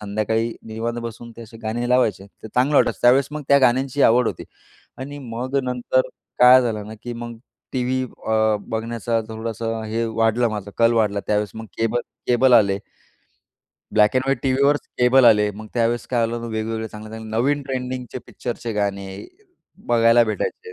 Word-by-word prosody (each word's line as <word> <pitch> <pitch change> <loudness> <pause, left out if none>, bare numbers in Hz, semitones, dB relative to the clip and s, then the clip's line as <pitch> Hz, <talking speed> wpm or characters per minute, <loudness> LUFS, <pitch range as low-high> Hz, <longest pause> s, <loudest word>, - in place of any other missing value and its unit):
संध्याकाळी 110 +2 -1
निवांत 115 +2 -4
बसून 115 0 -8
ते 115 - -9
असे 115 0 -13
गाणे 120 +2 -2
लावायचे 110 -6 +1
ते 110 +2 -13
चांगलं 130 +6 +1
वाटायचं. - - +3
त्यावेळेस 130 +3 +5
मग 150 0 -5
त्या 140 0 +6
गाण्यांची 130 +2 +2
आवड 120 +1 +3
होती. - - -6 0.5
आणि 145 +2 -7
मग 130 +1 -4
नंतर 125 +1 0 0.4
काय 125 +1 +8
झालं 110 -3 -3
ना, 110 - -8
की 120 - -5
मग 120 -1 -7 0.3
टीव्ही 130 0 0 0.3
अ, 110 -1 +2
बघण्याचा 115 0 -2
थोडंसं 115 0 -4
हे 115 +2 -2
वाढलं 115 +1 +1
माझा 105 -1 -5
कल 115 0 +4
वाढला 105 -3 +1
त्यावेळेस 105 -1 0
मग 110 0 -8
केबल 115 +1 +1 0.3
केबल 125 +1 +4
आले. 100 -4 +4 1.1
ब्लॅक 105 +1 +4
अँड 130 - +2
व्हाईट 135 -2 +1
टीव्हीवरच 140 +2 +2
केबल 125 +1 +5
आले. 105 -2 +5
मग 110 +2 -10
त्यावेळेस 120 0 0
काय 120 -2 +2
झाल 115 - -5
होत 115 - -6
वेगवेगळे 110 0 -3
चांगल्या-चांगल्या 110 +1 -7
नवीन 145 +3 +1
ट्रेंडिंगचे 130 -2 -5
पिक्चरचे 120 -2 -5
गाणे, 100 -2 -2 0.8
बघायला 115 0 +5
भेटायचे. 445 - -4
115 Hz, 165 wpm, -22 LUFS, 110-125 Hz, 1.1 s, काय